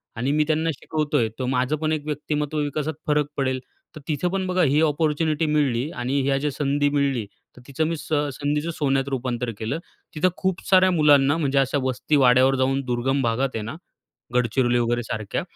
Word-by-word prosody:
आणि 125 Hz, +5 st, -1 dB
मी 150 Hz, +1 st, +3 dB
त्यांना 160 Hz, +1 st, +1 dB
शिकवतोय, 145 Hz, -7 st, -1 dB
तर 130 Hz, -, -1 dB
माझं 130 Hz, +3 st, +1 dB
पण 155 Hz, 0 st, 0 dB
एक 150 Hz, -1 st, -3 dB
व्यक्तिमत्त्व 150 Hz, 0 st, -2 dB
विकासात 150 Hz, +1 st, -2 dB
फरक 150 Hz, -1 st, +2 dB
पडेल. 130 Hz, -1 st, 0 dB, 0.4 s
तर 155 Hz, -, -9 dB
तिथं 160 Hz, +3 st, 0 dB
पण 190 Hz, -1 st, -1 dB
बघा 185 Hz, -1 st, +2 dB
ही 145 Hz, +2 st, +3 dB
अपॉर्च्युनिटी 155 Hz, 0 st, +1 dB
मिळाली 145 Hz, -3 st, +1 dB
आणि 130 Hz, +3 st, -1 dB
ह्या 135 Hz, 0 st, +1 dB
ज्या 145 Hz, +1 st, -1 dB
संधी 145 Hz, +1 st, 0 dB
मिळाली, 140 Hz, -6 st, 0 dB, 0.3 s
तर -, -, -13 dB
तिचं 140 Hz, +3 st, -1 dB
मी 165 Hz, -1 st, -2 dB
स -, -, -10 dB, 0.3 s
संधीचं 150 Hz, +3 st, -1 dB
सोन्यात 135 Hz, -2 st, 0 dB
रूपांतर 125 Hz, -2 st, -2 dB
केलं. 115 Hz, +9 st, -2 dB, 0.4 s
तिथं 185 Hz, +4 st, +3 dB
खूप 190 Hz, -1 st, -1 dB
साऱ्या 185 Hz, -1 st, +5 dB
मुलांना, 145 Hz, -2 st, +4 dB
म्हणजे 140 Hz, -3 st, +1 dB
अशा 135 Hz, +1 st, +1 dB
वस्ती 130 Hz, +3 st, 0 dB
वाड्यावर 130 Hz, 0 st, +5 dB
जाऊन, 135 Hz, +1 st, +1 dB
दुर्गम 130 Hz, +3 st, 0 dB
भागात 125 Hz, +3 st, 0 dB
आहे 110 Hz, -, -2 dB
ना, 120 Hz, +8 st, -6 dB, 0.6 s
गडचिरोली 120 Hz, 0 st, +2 dB
वगैरे 120 Hz, 0 st, 0 dB
सारख्या, 110 Hz, -2 st, -3 dB
140 Hz, 185 wpm, -23 LUFS, 130-155 Hz, 0.6 s, साऱ्या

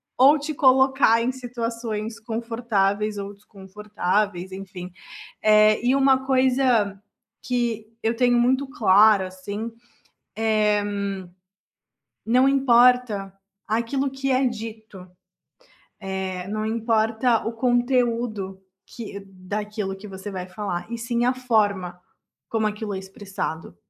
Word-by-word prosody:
ou 280 Hz, +4 st, +6 dB
te 300 Hz, +2 st, -4 dB
colocar 265 Hz, -3 st, +4 dB
em 240 Hz, +2 st, 0 dB
situações 230 Hz, -3 st, -5 dB
confortáveis 220 Hz, -3 st, -1 dB
ou 200 Hz, 0 st, -5 dB
desconfortáveis, 200 Hz, -2 st, -3 dB
enfim. 185 Hz, -2 st, -8 dB, 0.5 s
Eh, 215 Hz, +1 st, +5 dB
e 255 Hz, +2 st, +3 dB
uma 265 Hz, -1 st, +3 dB
coisa 255 Hz, -6 st, +2 dB, 0.4 s
que 235 Hz, -3 st, -2 dB, 0.2 s
eu 225 Hz, +1 st, +1 dB
tenho 245 Hz, 0 st, +3 dB
muito 260 Hz, +3 st, +2 dB
claro, 210 Hz, -3 st, +5 dB
assim, 200 Hz, +5 st, -6 dB, 0.7 s
eh, 215 Hz, -2 st, +2 dB, 1.4 s
não 250 Hz, +3 st, +4 dB
importa 250 Hz, -6 st, +3 dB, 0.3 s
aquilo 235 Hz, +5 st, -1 dB
que 270 Hz, 0 st, -3 dB
é 260 Hz, +1 st, +3 dB
dito, 220 Hz, -5 st, -7 dB, 1.1 s
eh, 185 Hz, 0 st, -4 dB
não 215 Hz, +1 st, -2 dB
importa 225 Hz, +1 st, +1 dB
o 230 Hz, -, -1 dB
conteúdo 240 Hz, -5 st, 0 dB, 0.2 s
que 210 Hz, -3 st, -8 dB
daquilo 195 Hz, +1 st, -5 dB
que 205 Hz, +2 st, -11 dB
você 195 Hz, +1 st, -8 dB
vai 185 Hz, -1 st, -6 dB
falar, 185 Hz, -1 st, -4 dB
e 235 Hz, -, -4 dB
sim 235 Hz, +1 st, -1 dB
a 250 Hz, -, +3 dB
forma 205 Hz, -8 st, 0 dB, 0.5 s
como 220 Hz, -1 st, 0 dB
aquilo 210 Hz, 0 st, -3 dB
é -, -, -3 dB
expressado. 190 Hz, -, -6 dB
220 Hz, 115 wpm, -23 LUFS, 200-245 Hz, 1.4 s, ou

